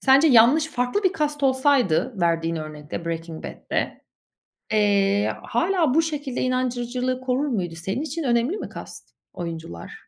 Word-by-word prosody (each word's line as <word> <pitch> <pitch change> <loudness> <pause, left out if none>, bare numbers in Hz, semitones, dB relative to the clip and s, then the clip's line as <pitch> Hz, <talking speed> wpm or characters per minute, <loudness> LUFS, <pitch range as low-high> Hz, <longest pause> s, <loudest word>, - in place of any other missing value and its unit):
Sence 275 +4 +5
yanlış 255 +6 +6
farklı 250 +9 -1
bir 375 0 +3
cast 295 -1 -1
olsaydı 260 - +2
verdiğin 165 -1 +1
örnekte, 155 +1 -6
Breaking 165 -1 -5
Bad'de, - - -4 0.7
eee, 205 -1 +3
hâlâ 315 +4 +1
bu 325 - +5
şekilde 295 -5 -3
inandırıcılığı 255 0 -1
korur 260 +3 0
muydu? 185 - -2
Senin 190 - -3
için 315 +2 -4
önemli 245 - +1
mi - - -6
cast - - -9 0.2
oyuncular? 165 - -7
250 Hz, 135 wpm, -24 LUFS, 175-280 Hz, 0.7 s, yanlış